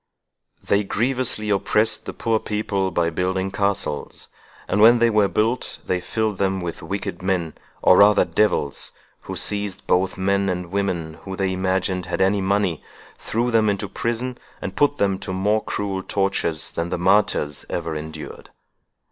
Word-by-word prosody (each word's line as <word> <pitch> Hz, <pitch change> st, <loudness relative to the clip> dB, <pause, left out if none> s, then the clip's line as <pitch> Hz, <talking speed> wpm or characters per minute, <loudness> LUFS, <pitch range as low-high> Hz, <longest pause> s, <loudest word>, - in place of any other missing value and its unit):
"They 100 Hz, +1 st, +2 dB
grievously 115 Hz, 0 st, 0 dB
oppressed 105 Hz, +2 st, +1 dB
the -, -, -4 dB
poor 115 Hz, -1 st, 0 dB
people 105 Hz, -3 st, -1 dB
by 85 Hz, -1 st, 0 dB
building 95 Hz, +3 st, -1 dB
castles; 100 Hz, -7 st, -2 dB, 0.4 s
and 100 Hz, -, +1 dB
when 115 Hz, +2 st, +8 dB
they 115 Hz, 0 st, +3 dB
were 105 Hz, -2 st, +4 dB
built, 115 Hz, +5 st, -1 dB
they 90 Hz, -1 st, -1 dB
filled 110 Hz, -1 st, -2 dB
them 95 Hz, -1 st, +1 dB
with 85 Hz, -2 st, -5 dB
wicked 95 Hz, +1 st, -4 dB
men, 90 Hz, -4 st, -1 dB, 0.3 s
or 90 Hz, -, +7 dB
rather 105 Hz, +1 st, +6 dB
devils, 105 Hz, -9 st, 0 dB, 0.3 s
who -, -, -5 dB
seized 100 Hz, -1 st, -2 dB
both 90 Hz, +1 st, +1 dB
men 100 Hz, +1 st, +1 dB
and 90 Hz, -1 st, -3 dB
women 85 Hz, -5 st, -2 dB
who 95 Hz, -1 st, -6 dB
they 95 Hz, -1 st, 0 dB
imagined 95 Hz, -1 st, -1 dB
had 90 Hz, -, -2 dB
any 95 Hz, +1 st, +3 dB
money, 95 Hz, -4 st, 0 dB, 0.4 s
threw 120 Hz, +2 st, -1 dB
them 110 Hz, -2 st, +3 dB
into 100 Hz, 0 st, -1 dB
prison, 120 Hz, +5 st, -3 dB, 0.2 s
and 95 Hz, -1 st, -5 dB
put 145 Hz, 0 st, +2 dB
them 95 Hz, -1 st, +1 dB
to 95 Hz, -, -5 dB
more 105 Hz, +3 st, +1 dB
cruel 100 Hz, -2 st, -3 dB
tortures 95 Hz, -5 st, -1 dB
than 85 Hz, +1 st, -3 dB
the -, -, -1 dB
martyrs 90 Hz, -5 st, +2 dB
ever 85 Hz, -2 st, -3 dB
endured. 80 Hz, 0 st, -8 dB
95 Hz, 160 wpm, -22 LUFS, 90-105 Hz, 0.4 s, when